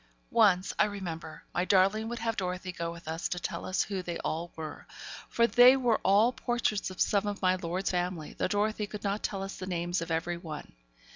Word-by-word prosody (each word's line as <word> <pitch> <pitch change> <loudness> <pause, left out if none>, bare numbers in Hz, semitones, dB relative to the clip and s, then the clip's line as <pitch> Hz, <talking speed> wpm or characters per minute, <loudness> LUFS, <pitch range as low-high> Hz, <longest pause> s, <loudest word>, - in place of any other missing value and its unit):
Once, 195 -5 +4
I - - +6
remember, 170 -6 -6
my 175 - +1
darling 195 +4 +3
would 240 - -4
have 225 -1 -1
Dorothy 185 -1 -3
go 170 -1 -4
with 170 -1 -11
us 160 +2 -2
to 180 - -2
tell - - -4
us 185 - +1
who 195 -3 -3
they 175 -1 -4
all 170 +2 -3
were; 155 -2 -7 0.4
for 235 - +3
they 245 +2 +7
were 245 -4 +2
all 210 +6 +4
portraits 240 -6 -1
of 185 - -10
some 205 0 +2
of 205 -1 -4
my 185 0 +5
lord's 180 +1 -2
family, 180 -3 -2
though - - -1
Dorothy 210 +1 0
could 210 0 -8
not 200 +1 -1
tell 195 -1 -2
us 195 - -6
the 185 - -6
names 175 -1 -1
of 165 - -5
every 165 +2 -1
one. 160 -4 -8
185 Hz, 215 wpm, -30 LUFS, 175-210 Hz, 0.4 s, they